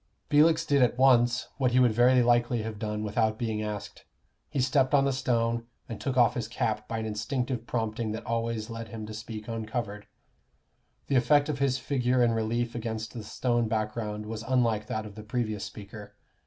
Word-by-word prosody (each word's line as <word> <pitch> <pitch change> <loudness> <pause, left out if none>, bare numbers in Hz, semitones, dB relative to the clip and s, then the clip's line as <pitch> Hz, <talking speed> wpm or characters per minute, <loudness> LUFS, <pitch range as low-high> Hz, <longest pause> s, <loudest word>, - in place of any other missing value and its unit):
Felix 160 +2 +5
did 140 -3 +3
at 125 0 +3
once 125 -2 +4
what 130 -3 +2
he 130 - +5
would 125 -2 +5
very 125 +2 +5
likely 120 -1 +2
have 110 -1 -5
done 105 -1 -3
without 110 +1 0
being 110 -2 -2
asked 105 -1 -6 0.5
he 145 - -2
stepped 130 +1 +3
on 135 -1 +4
the 140 - +1
stone, 115 -3 0 0.2
and 115 - -7
took 135 -2 -2
off 120 -2 +5
his 115 -3 -3
cap 110 -1 -2
by 115 - -3
an 110 - -3
instinctive 115 +3 -2
prompting 110 -1 -2
that 110 - -5
always 115 -1 -2
led 115 0 -6
him 110 -1 -7
to 110 - -8
speak 110 0 -7
uncovered. 110 -2 -4 1.0
The 135 - +2
effect 145 +4 +4
of 140 -3 -2
his 135 -2 +2
figure 125 -2 +1
in 120 - +3
relief 115 +1 -1
against 110 -1 -4
the 115 -3 -6
stone 120 +2 0
background 110 -1 -2
was 110 0 -5
unlike 115 -3 +1
that 110 0 -3
of 105 - -9
the 110 - -9
previous 110 -2 -2
speaker. 105 0 -10
115 Hz, 195 wpm, -28 LUFS, 110-125 Hz, 1.0 s, Felix